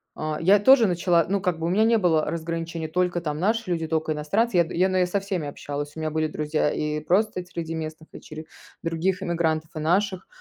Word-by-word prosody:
э, 155 0 -3
я 195 +5 +5
тоже 245 +3 +6
начала, 175 -3 +2
ну, 195 +2 0
как 180 -3 0
бы, 165 - -4
у - - 0
меня 200 +5 +3
не 230 +1 +4
было 165 -6 +2
разграничений: 165 0 -4
только 175 +1 0
там 150 -2 -3
наши 215 +1 0
люди, 165 -2 -1
только 160 0 -1
иностранцы. 190 +8 0
Я 170 - +6
д - - -7
я, 180 +2 +3
наверно, 185 -1 +1
со 200 - +1
всеми 190 -6 -3
общалась, 145 0 -6
у - - -7
меня 155 0 -2
были 155 0 0
друзья 150 0 -1
и 150 0 -2
просто 185 +5 +1
среди 170 -2 -6
местных, 160 0 -6
дочери 155 0 -10 0.4
других 180 +3 -1
иммигрантов 160 -3 -1
и - - -3
наших. 185 +4 0
170 Hz, 220 wpm, -24 LUFS, 155-185 Hz, 0.4 s, тоже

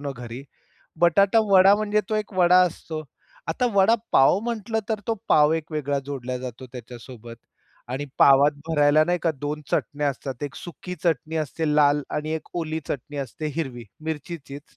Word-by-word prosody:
ना 145 -1 -4
घरी, 120 +1 -8 0.6
बटाटा 195 +5 +4
वडा 195 +1 +7
म्हणजे 210 0 +1
तो 220 - -1
एक 215 -1 -2
वडा 180 -1 +5
असतो. 160 -2 -3 0.5
आता 250 - 0
वडा 200 +3 +5 0.2
पाव 135 +7 +5
म्हंटलं 225 -1 -3
तर 220 -2 -1
तो 225 - +1
पाव 150 0 +5
एक 160 -1 -3
वेगळा 145 -2 -1
जोडला 130 -3 -4
जातो 125 0 -8
त्याच्यासोबत 120 -1 -10 0.6
आणि 135 +3 -3
पावात 140 +2 +6 0.2
भरायला 150 -1 +4
नाही 175 +2 0
का 165 - +2
2 150 +1 -4
चटण्या 145 -1 0
असतात. 135 -1 -6
1 145 -2 -4
सुकी 180 +1 -8
चटणी 160 -1 0
असते, 155 +1 -2
लाल 145 0 +4
आणि 155 +1 -3
1 160 -1 -5
ओली 160 0 -3
चटणी 145 +2 -5
असते 140 +3 -5
हिरवी 130 -7 -4 0.2
मिरचीचीच. 150 -2 -6
150 Hz, 165 wpm, -24 LUFS, 140-180 Hz, 0.6 s, वडा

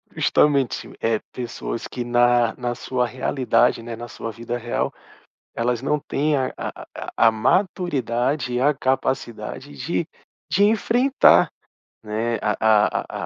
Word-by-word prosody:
Justamente, 140 -4 +2
eh, 115 -1 +1
pessoas 120 -1 -5
que 125 - -5
na 120 -1 +3
na 120 -1 -3
sua 125 0 -1
realidade, 125 -2 +1
né, 115 -1 -6
na 120 +1 -8
sua 115 -1 -6
vida 115 +2 -5
real 120 0 -2 0.6
elas 120 +2 -1
não 150 +2 0
têm 150 +1 0
a 130 -1 -1
a - - -6
a - - -6
a 115 - +7
a - - +5
maturidade 140 - 0
e 125 - 0
a 145 +3 +4
capacidade 130 - -2
de - - -2 0.4
de 200 - +4
enfrentar, 240 +6 +4 0.5
né, 110 +2 -1
a 105 - +1
a 110 -1 +2
120 Hz, 140 wpm, -22 LUFS, 115-140 Hz, 0.6 s, a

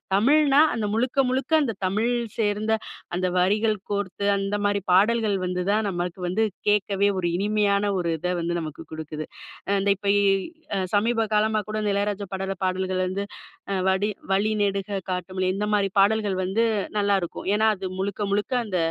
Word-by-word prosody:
தமிழ்னா 285 +6 +5
அந்த 220 -2 -1
முழுக்க 245 +4 -1
முழுக்க 260 +3 -2
அந்த 230 -5 -1
தமிழ் 215 +6 +1 0.3
சேர்ந்த 215 +1 +1 0.4
அந்த 185 +1 0
வரிகள் 210 +4 +2
கோர்த்து 200 -1 -2
அந்த 195 +1 -2
மாரி 205 0 +1
பாடல்கள் 210 +1 +3
வந்து 180 0 -2
தான், 215 0 +1
நமக்கு 175 0 -3
வந்து 195 +5 +1 0.3
கேட்கவே 200 -1 +2
ஒரு 175 - 0
இனிமையான 205 0 +1
ஒரு 170 -1 -1
இத 180 +2 -1
வந்து 170 +1 -1
நமக்கு 155 -1 -7
கொடுக்குது. 155 -1 -6 0.4
அ - - +2
இந்த 200 - +1
இப்ப 200 0 -2
இ - - +3 0.6
அ - - +1 0.2
சமீப 225 +1 +2
காலமா 215 0 +2
கூட 215 - -2
இந்த 205 - +1
இளையராஜா 200 0 -1
பாடல் 195 0 -4
பாடல்கள் 185 0 -1
வந்து, 195 +2 -3 0.6
வடி 190 +3 +1 0.2
"வழி 200 +3 +2
நெடுக 200 -1 -1 0.2
காட்டு 180 0 -3
மல்லி," 185 0 0
இந்த 205 +1 -1
மாரி 200 -1 +3
பாடல்கள் 205 -1 +3
வந்து 195 +5 +1 0.3
நல்லாயிருக்கும். 200 -4 0
ஏன்னா, 215 +1 +2
அது 190 0 -7
முழுக்க 200 +1 -3
முழுக்க 205 +5 0
அந்த 195 -4 -2
200 Hz, 170 wpm, -24 LUFS, 190-215 Hz, 0.6 s, தமிழ்னா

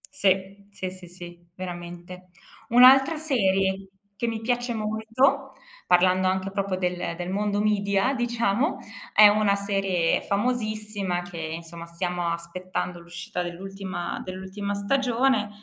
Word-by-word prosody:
Se. 195 -5 +1 0.2
Se, 185 -2 -4
se, 185 -1 -11
sì, 175 0 -11 0.2
veramente. 175 0 -8 0.4
Un'altra 265 +5 +7
serie 195 -10 +1 0.3
che 235 - -1
mi 225 -1 -3
piace 245 +1 -1
molto, 225 +6 0 0.3
parlando 185 +1 +4
anche 190 +1 -1
proprio 195 -1 -1
del 180 -2 -2
del 175 +1 -5
mondo 205 +1 0
media, 200 +2 +1
diciamo, 240 - 0 0.4
è 210 - +9
una 205 -1 +3
serie 195 -4 0
famosissima 210 -4 -1
che 175 -1 -9
insomma 165 +1 -6
stiamo 175 +1 -3
aspettando 175 +1 -4
l'uscita 170 +1 -6
dell'ultima 185 0 -5
dell'ultima 190 +2 -5
stagione 240 +1 +1
195 Hz, 120 wpm, -25 LUFS, 180-220 Hz, 0.4 s, è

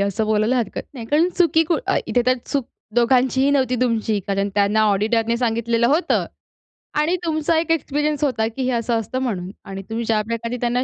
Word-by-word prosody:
असं 200 +2 0
बोलायला 215 +3 +2
हरकत 230 -5 -2
नाही, 230 -3 -7
कारण 310 +7 +3
चुकी 330 -2 +4
कु 330 +1 +1
अ, - - +2
इथे 245 - +1
तर 255 0 +4
चूक 275 -4 -2 0.3
दोघांचीही 260 +3 +3
नव्हती 260 -3 +1
तुमची, 225 -3 +1
कारण 195 0 0
त्यांना 205 +1 +2
ऑडिटरने 225 +3 +1
सांगितलेलं 235 -1 +1
होतं 300 +8 +1 0.7
आणि 315 +4 +2
तुमचा 315 0 +1
एक 325 0 -2
एक्सपिरियन्स 295 -1 0
होता, 225 -6 +1
की 230 +4 -4
हे 255 - 0
असं 230 0 0
असतं 240 +4 -4
म्हणून 190 -8 -3
आणि 195 -1 -6
तुम्ही 230 +1 -3
ज्या 220 -1 +2
प्रकारे 230 +1 -3
त्यांना 245 +1 +1
235 Hz, 190 wpm, -21 LUFS, 220-275 Hz, 0.7 s, चुकी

